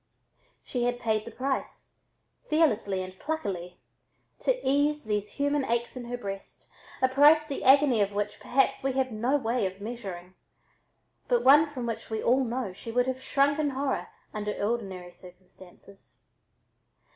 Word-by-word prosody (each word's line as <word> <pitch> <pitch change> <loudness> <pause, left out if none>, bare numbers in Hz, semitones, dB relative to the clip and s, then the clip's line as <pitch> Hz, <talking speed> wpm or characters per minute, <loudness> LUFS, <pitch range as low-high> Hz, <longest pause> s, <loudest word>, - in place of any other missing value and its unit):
She 245 -2 -2
had 245 0 -1
paid 220 -3 0
the - - -7
price, 265 +1 -4 0.5
fearlessly 215 - +2
and 185 0 -10
pluckily, 195 - -4 0.6
to - - +1
ease 290 +2 +2
these 210 -1 -2
human 285 0 0
aches 235 0 -1
in 250 -1 -6
her 245 +1 -4
breast, 195 -4 -8 0.3
a - - +7
price 295 +4 +5
the 280 - -4
agony 265 -4 +5
of 200 0 +1
which 205 +1 -3
perhaps 270 +2 +1
we 270 -1 0
have 260 -1 0
no 240 +6 +1
way 235 -5 0
of 190 +1 -9
measuring, 195 -5 -7 0.9
but - - +2
one 295 +4 +7
from 265 -5 -6
which 230 -1 -5
we 220 -1 -3
know 250 -4 +1
she 230 +4 -8
would 245 +1 +2
have 260 0 -3
shrunk 285 +2 +2
in 300 -2 +1
horror 270 0 -2 0.3
under 210 0 -3
ordinary 195 -5 -3
circumstances. 185 +2 -16
245 Hz, 155 wpm, -28 LUFS, 205-275 Hz, 0.9 s, a